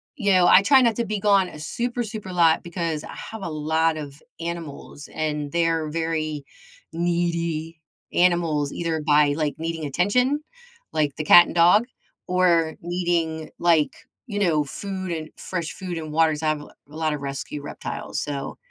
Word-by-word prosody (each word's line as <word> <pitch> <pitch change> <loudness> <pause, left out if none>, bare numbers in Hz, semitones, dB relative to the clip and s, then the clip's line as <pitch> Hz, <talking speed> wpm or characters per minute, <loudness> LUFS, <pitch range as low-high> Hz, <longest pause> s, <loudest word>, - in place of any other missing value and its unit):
you 205 -7 +1
know, 180 -1 +5
I 185 - +8
try 265 +6 +6
not 230 -3 +3
to 235 - 0
be 215 -1 -2
gone 195 -2 +3
a 150 - -11
super, 240 +9 -2
super 215 -3 -7
lot 165 -2 +4
because 170 -3 -3
I - - -9
have 220 -1 -8
a 170 - -3
lot 160 +1 0
of 145 -1 -8 0.2
animals, 165 -3 -7
and 150 -2 -2
they're 165 -2 +1
very 155 -2 -2 0.5
needy 170 -2 -1 0.3
animals 170 -5 +2
either 165 -2 -2
by, 145 -1 +4
like, 150 -2 -1
needing 165 -1 -4
attention, 250 - +1 0.5
like 150 -3 0
the 155 - -3
cat 175 +3 +9
and - - -7
dog, 175 +7 +5 0.4
or 170 -3 +2
needing, 170 -2 -1
like, 165 -3 +3 0.4
you 205 -3 -3
know, 165 -7 +2
food 190 +5 -5
and 160 -2 -4
fresh 170 -3 -4
food 180 -2 -5
and 155 -1 -6
water 160 0 +4
'cause 150 +1 -4
I - - +1
have 155 -1 -1
a 150 - -11 0.3
lot 155 -1 0
of 145 - -5
rescue 140 +1 -5
reptiles. 145 - -5
So, 140 -2 -5
165 Hz, 175 wpm, -24 LUFS, 155-180 Hz, 0.5 s, cat